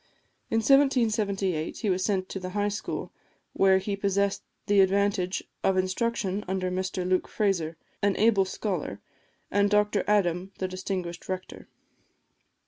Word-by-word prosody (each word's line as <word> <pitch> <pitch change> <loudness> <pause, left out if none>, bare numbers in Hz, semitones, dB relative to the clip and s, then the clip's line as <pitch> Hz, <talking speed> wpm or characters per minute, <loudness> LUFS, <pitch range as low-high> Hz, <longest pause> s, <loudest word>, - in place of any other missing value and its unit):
In 225 - +2
1778 215 - +2
he 215 - -1
was 185 0 0
sent 190 -2 0
to 195 - -4
the 185 0 -5
High 205 0 +2
School, 205 +1 -4 0.4
where 190 -1 +5
he 200 +1 -2
possessed 200 0 0 0.2
the 205 -1 +3
advantage 195 -1 +1 0.2
of 190 -1 +2
instruction 195 +1 -1
under 185 -1 -1
Mr 185 0 -2
Luke 185 0 +1
Fraser, 170 -6 0 0.2
an 200 -1 +2
able 210 -3 +4
scholar, 180 - -3 0.5
and 205 0 +3
Dr 210 0 +2
Adam, 190 -2 +1
the 185 - -2
distinguished 185 -2 -5
rector. 185 0 -6
195 Hz, 135 wpm, -27 LUFS, 185-205 Hz, 0.5 s, where